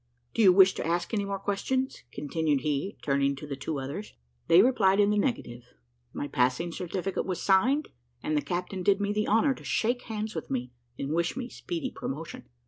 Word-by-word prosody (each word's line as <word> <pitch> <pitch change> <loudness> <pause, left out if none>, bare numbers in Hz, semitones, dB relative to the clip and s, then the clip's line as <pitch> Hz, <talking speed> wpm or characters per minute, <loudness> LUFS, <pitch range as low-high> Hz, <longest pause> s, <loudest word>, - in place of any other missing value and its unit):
Do - - +1
you 195 -4 +8
wish 190 0 +7
to - - -4
ask 175 +5 -1
any 205 -2 0
more 200 0 -2
questions?" 255 +7 -2
continued 145 +1 0
he, 150 +6 -2
turning 140 0 +1
to 140 - -8
the 145 -2 -4
two 145 +2 -4
others. 140 +11 -6 0.3
They 175 +4 +7
replied 205 -6 +3
in 205 0 +5
the 210 - +1
negative; 125 - -3 0.4
my 145 - -4
passing 130 +7 +1
certificate 185 +2 -3
was 185 -2 -2
signed, 250 +10 +3 0.3
and 155 - 0
the 150 - +2
captain 180 +5 -3
did 195 +2 +3
me 205 0 0
the 210 0 0
honour 225 +6 +4
to - - -13
shake 245 +2 0
hands 220 -1 -4
with 160 - -5
me, 125 -1 -2 0.3
and 140 +2 -3
wish 170 +7 0
me 250 -2 -4
speedy 330 -4 -4
promotion. 150 - -6
185 Hz, 200 wpm, -28 LUFS, 145-210 Hz, 0.4 s, you